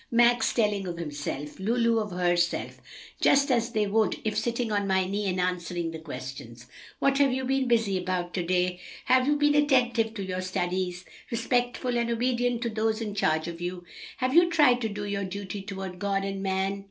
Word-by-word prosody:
Max 240 +1 +4
telling 210 -4 0
of 170 -1 -4
himself, 145 -2 -5
Lulu 230 +3 +2
of 210 -1 -3
herself, 175 -1 0 0.4
just 280 0 +4
as 235 -1 +2
they 215 -3 +1
would 215 +2 +1
if 215 -1 -1
sitting 235 -1 -1
on 205 -1 0
my 190 -1 +2
knee 200 +2 -2
and 185 -1 -1
answering 175 -2 -2
the 160 - -7
questions, 130 -5 -8 0.3
'What 275 0 +2
have 280 -2 +4
you 260 +1 -2
been 265 0 +1
busy 225 -5 +2
about 180 -1 -2
to 185 - -1
day? 180 +1 0 0.3
Have 255 0 +4
you 295 - +3
been 290 0 +3
attentive 250 -6 +2
to 200 - -4
your 185 0 -3
studies, 185 -1 -2 0.2
respectful 245 +1 0
and 235 0 -1
obedient 245 0 0
to 235 - -1
those 220 0 0
in 215 -3 -4
charge 160 -5 +1
of 170 0 -7
you? 175 0 -4 0.3
Have 255 0 0
you 345 +2 +6
tried 290 -7 +4
to 225 - -1
do 205 0 -5
your 200 -1 -2
duty 195 +1 -5
toward 190 -2 -6
God 195 0 0
and 195 0 -4
man?' 195 +1 -1
205 Hz, 195 wpm, -27 LUFS, 180-240 Hz, 0.4 s, you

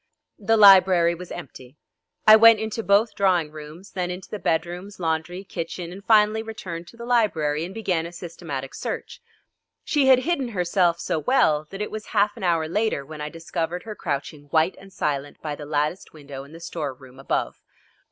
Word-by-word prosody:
The 225 +2 +2
library 185 -4 +7
was 175 +1 -9
empty. 130 +1 -10 0.5
I 215 - +10
went 225 0 +7
into 220 +1 -3
both 210 +2 +3
drawing 180 -6 +1
rooms, 155 +5 -11
then 180 -1 -3
into 180 +1 -7
the 210 - -4
bedrooms, 175 +5 -2
laundry, 170 +2 -2
kitchen, 175 -2 -6
and 195 +2 -10
finally 215 0 +4
returned 180 -7 -7
to 230 - -15
the 235 - -8
library 165 -11 +1
and 180 - -8
began 185 -6 -1
a - - -10
systematic 165 -6 -7
search. - - -6 0.6
She 285 -3 +2
had 260 -1 +6
hidden 305 -6 0
herself 180 -4 +1
so 160 - -1
well 155 - +2
that 195 +2 -5
it - - -6
was 215 0 -6
half 205 +1 +3
an - - -9
hour 165 -3 +1
later 205 -5 -1
when 155 +1 -9
I 150 - -4
discovered 165 +1 -4
her 220 - -6
crouching 145 -4 -4
white 160 +4 +1
and 195 0 -15
silent 145 -5 -3
by 150 -2 -4
the 145 0 -8
latticed 150 +5 -2
window 140 -3 -9
in 140 - -16
the 165 - -11
store 155 -5 -5
room 130 0 -16
above. 135 - -2
175 Hz, 190 wpm, -24 LUFS, 155-205 Hz, 0.6 s, I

